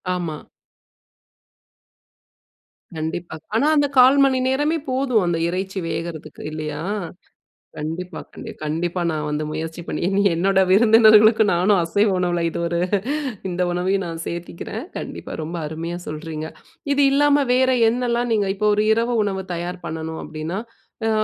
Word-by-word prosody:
ஆமா. 165 -4 -3 2.6
கண்டிப்பா. 160 +1 -4 0.2
ஆனா 275 +6 +3
அந்த 290 -1 +3
1/4 260 +3 +7
மணி 260 -1 +2
நேரமே 295 +5 +1
போதும் 255 -5 +1
அந்த 170 -1 +1
இறைச்சி 190 +2 -3
வேகுறதுக்கு 160 -3 -5
இல்லையா? 155 -1 -5 1.0
கண்டிப்பா, 165 +5 -5
கண்டி - - -8
கண்டிப்பா 170 +4 -2
நான் 150 -1 -3
வந்து 150 +1 -2
முயற்சி 160 +2 -5
பண்ணி, - - -3
இனி 200 +1 +2
என்னோட 190 +3 +2
விருந்தினர்களுக்கும் 220 0 +6
நானும் 185 +3 +3
அசைவ 205 +6 +2
உணவுல 175 -1 0
இது - - -5
ஒரு 170 0 -1 0.7
இந்த 180 0 -1
உணவையும் 185 +2 0
நான் 165 -1 -5
சேர்த்துக்கிறேன். 170 - -6
கண்டிப்பா - - -7
ரொம்ப 165 +3 -5
அருமையா 165 +3 -5
சொல்கிறீங்க. 155 0 -5 0.5
இது 285 - +1
இல்லாம 290 0 +4
வேற 260 +1 +3 0.2
என்னலாம் 240 0 0
நீங்க 205 -3 +1
இப்போ 210 +1 +1
ஒரு 210 +1 +1
இரவு 235 +2 0
உணவு 190 -2 -2
தயார் 175 +1 -5
பண்ணணும் 160 0 -5
அப்படின்னா, 155 +5 -5 0.5
அ - - +2
180 Hz, 135 wpm, -22 LUFS, 160-220 Hz, 2.6 s, 1/4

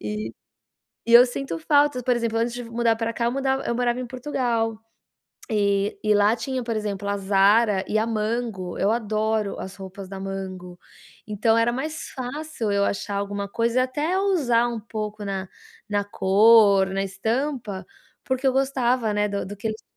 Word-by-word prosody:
E 105 +1 -4 0.8
e 235 - +2
eu 240 +1 +10
sinto 245 -7 -4
falta, 285 - +2
por 250 -1 +2
exemplo, 230 -1 -1
antes 235 +1 0
de 245 - -5
mudar 230 0 +1
para 225 0 -2
cá, 235 - -1
eu 235 - +1
mudav 270 0 0
eu 235 - 0
morava 245 0 0
em 250 - -3
Portugal, 235 -4 -2 0.7
e 200 -1 +1
e 210 0 +3
lá 205 +3 +4
tinha, 255 +2 -3
por 230 -1 -2
exemplo, 205 -2 -3
a 200 - 0
Zara 200 +1 +3
e 215 - +1
a 220 - +1
Mango. 215 -4 -2
Eu 205 +3 +2
adoro 215 -2 -1
as 190 +1 -7
roupas 190 0 -9
da 195 0 -7
Mango, 185 -2 -6 0.5
então 220 +2 +2
era 235 +1 +2
mais 310 +5 -4
fácil 260 -3 -4
eu 200 0 +2
achar 200 0 -2
alguma 200 0 -3
coisa 235 +4 +1
e - - +4
até 295 +8 -1
ousar 265 -12 +2
um 235 -1 -3
pouco 210 -1 -5
na 195 -1 -4 0.4
na 205 -1 0
cor, 200 0 +5
na 195 0 -1
estampa, 220 0 -2 0.4
porque 260 +1 -1
eu 260 - +4
gostava, 255 -4 +1
né, 210 0 +2
do 200 -2 -3
do 205 +1 -7
que 215 - -6
eles 220 0 -5
220 Hz, 185 wpm, -24 LUFS, 200-245 Hz, 0.8 s, eu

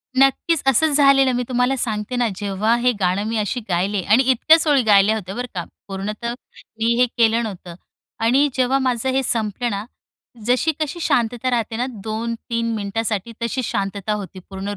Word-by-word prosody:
नक्कीच 270 +4 +3
असंच 285 +3 +3
झालेलं 275 -2 +5
मी 245 - 0
तुम्हाला 250 +1 +1
सांगते 215 0 -3
ना, 245 -1 +1
जेव्हा 205 +3 0
हे 250 +1 +3
गाणं 185 +1 +1
मी 225 0 -2
अशी 215 +3 -1
गायले 190 +3 0
आणि 220 +8 +4
इतक्याच 315 +6 +4
ओळी 285 -3 +4
गायल्या 210 0 +5
होत्या, 195 -3 -6
बरं 245 +1 -4
का, 175 - -2 0.2
पूर्णतः 210 +4 -4 0.5
मी 230 +1 +2
हे 250 - +6
केलं 230 0 +3
नव्हतं. 185 -5 -7 0.4
आणि 255 +6 +3
जेव्हा 260 +1 +1
माझं 255 -1 0
हे 265 +1 +1
संपलं 230 0 -1
ना, 200 +1 -4 0.6
जशी 250 +7 +2
कशी 310 +2 -3
शांतता 245 -2 0
राहते 230 -2 -1
ना 245 - 0 0.2
2-3 230 +1 -3
मिनिटासाठी, 210 +1 -3
तशी 250 +3 -2
शांतता 200 -1 -2
होती 200 -2 -6
पूर्ण 195 +1 -5
230 Hz, 170 wpm, -21 LUFS, 205-255 Hz, 0.6 s, हे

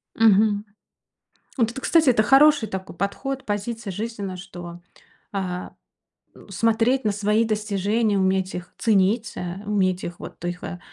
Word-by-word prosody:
Мгм. 210 -1 +4 0.9
Вот 230 -4 +2
это, 270 - -7
кстати, 315 -1 +4
это 220 -3 +4
хороший 270 0 +5
такой 190 -2 -6
подход, 265 +9 -3
позиция 210 +1 -3
жизненная, 200 -1 -4
что, 175 -2 -9 0.5
а, 185 -2 -4 0.6
н - - -16
смотреть 230 +6 +2
на 210 - +3
свои 210 +2 +1
достижения, 210 0 0
уметь 190 0 +1
их 180 0 -7
ценить, 215 +1 +2
э, 180 +2 -5
уметь 190 -3 +1
их, 175 - -6
вот - - -10
их, 175 0 -4
э, 180 - -6
205 Hz, 145 wpm, -23 LUFS, 190-225 Hz, 0.9 s, хороший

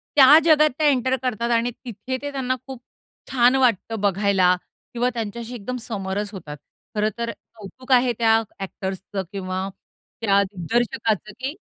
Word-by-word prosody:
त्या 285 +1 +9
जगात 305 -1 +6
त्या 305 -1 +3
एंटर 260 -2 +2
करतात 235 -1 -1
आणि 235 +1 +2
तिथे 255 +3 -4
ते 285 0 -4
त्यांना 255 -2 -1
खूप 260 -3 -8 0.5
छान 250 0 +4
वाटतं 230 -4 +1
बघायला 195 -2 +3 0.4
किंवा 245 +1 +1
त्यांच्याशी 230 +1 -5
एकदम 250 +3 -5
समरस 205 -2 -4
होतात. 150 -6 -8 0.4
खरंतर 220 +2 -1 0.2
कौतुक 230 +5 -10
आहे 250 -1 +5
त्या 225 -1 +5 0.2
ॲक्टर्सचं 190 0 -5
किंवा 185 -1 -3 0.5
त्या 200 -2 +4
दिग्दर्शकाचं 210 +2 -1
की 270 +4 -4
230 Hz, 140 wpm, -23 LUFS, 200-255 Hz, 0.5 s, त्या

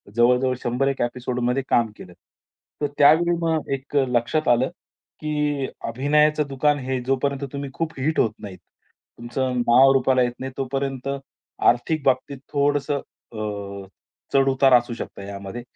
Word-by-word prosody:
जवळ-जवळ 125 +2 +3
100 125 +3 0
एक 135 - -1
एपिसोडमध्ये 125 +1 -1
काम 115 -2 +2
केलं. 90 - -12 0.7
तर 145 - +2
त्यावेळी 160 +4 +5
मग 160 -2 -1
एक 135 +2 -6
लक्षात 125 +6 0
आलं, 120 +3 +3 0.5
की 150 -2 -1 0.2
अभिनयाचं 150 +5 +2
दुकान 145 +2 +1
हे 130 -1 -2
जोपर्यंत 135 +1 0
तुम्ही 140 0 -4
खूप 165 +2 -3
हिट 155 +4 0
होत 110 - +3
नाहीत, 100 -3 -8 0.6
तुमचं 120 +2 -2
नाव 125 +3 +6
रुपाला 130 -1 +3
येत 120 - 0
नाही, 130 0 -5
तोपर्यंत 135 0 -3 0.6
आर्थिक 140 +6 0
बाबतीत 135 +1 +1 0.2
थोडंसं 145 0 +1 0.3
अ, 100 -2 -5 0.5
चढ-उतार 135 -1 +4
असू 120 -1 +4
शकतो 115 - -7
यामध्ये. 100 +3 -7
130 Hz, 135 wpm, -23 LUFS, 120-140 Hz, 0.7 s, नाव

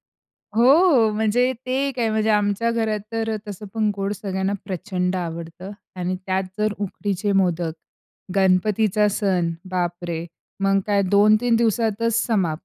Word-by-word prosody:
हो, - - -78 0.5
हो 270 -5 +5
म्हणजे 220 +4 +2
ते 270 +2 0
काय 230 -3 0
म्हणजे 220 0 0
आमच्या 210 +2 +2
घरात 220 -2 0
तर 225 0 -2
अ, 215 - -2
तसं 205 +1 -7
पण 215 -2 +1
गोड 195 0 -2
सगळ्यांना 195 -1 -2
प्रचंड 185 -1 -2
आवडतं 170 +2 -6 0.2
आणि 180 0 -2
त्यात 190 0 +1 0.2
जर 215 0 +1
उकडीचे 205 0 -2
मोदक 175 -4 +1 0.6
गणपतीचा 205 +2 +3
सण 190 -4 0 0.2
बापरे! 175 -2 -2 0.4
मग 195 0 +3
काय 200 -1 +3
2-3 215 +4 +4
दिवसातच 230 0 +1
समाप्त. 185 -9 0
205 Hz, 140 wpm, -22 LUFS, 185-220 Hz, 0.6 s, हो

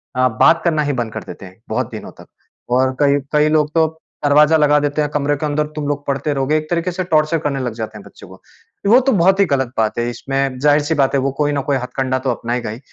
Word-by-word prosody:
अ, 130 0 +3
बात 130 +8 +3
करना 160 -3 +1
ही 145 -1 -1
बंद 110 -1 -10
कर 110 - -6
देते - - -10
हैं, 95 +3 -16
बहुत - - -2
दिनों - - -8
तक। - - -16 0.4
और 130 +1 +1
कई 145 0 +3
कई 150 0 +3
लोग 155 -1 +1
तो 160 -1 +3 0.4
दरवाजा 150 +2 +5
लगा 150 -1 +4
देते 145 +1 -1
हैं, 150 - -1
कमरे 145 0 0
के 155 - -3
अंदर 150 0 0
तुम 150 -2 -3
लोग 145 0 -3
पढ़ते 140 +2 -1
रहोगे। 135 +2 0
एक 155 0 -5
तरीके 175 +1 -1
से 185 +2 -3
टॉर्चर 155 +1 +3
करने 145 -3 -2
लग 125 -3 -3
जाते 110 -1 -6
हैं 105 - -12
बच्चे - - -14
को। - - -15 0.5
वो 240 +5 +7
तो 270 +1 +1
बहुत 190 0 +3
ही 200 - +5
गलत 130 -6 -1
बात 110 +1 0
है, 120 - -1
इसमें 135 +1 -2
ज़ाहिर 145 +2 +3
सी 155 +2 -1
बात 135 -2 +1
है, - - +3
वो 135 0 0
कोई 145 -1 +1
ना 140 - -1
कोई 140 - +2
हथकंडा 130 +1 -2
तो 130 - +1
अपनाएगा 120 0 -3
ही। 110 - -8
145 Hz, 265 wpm, -18 LUFS, 130-155 Hz, 0.5 s, वो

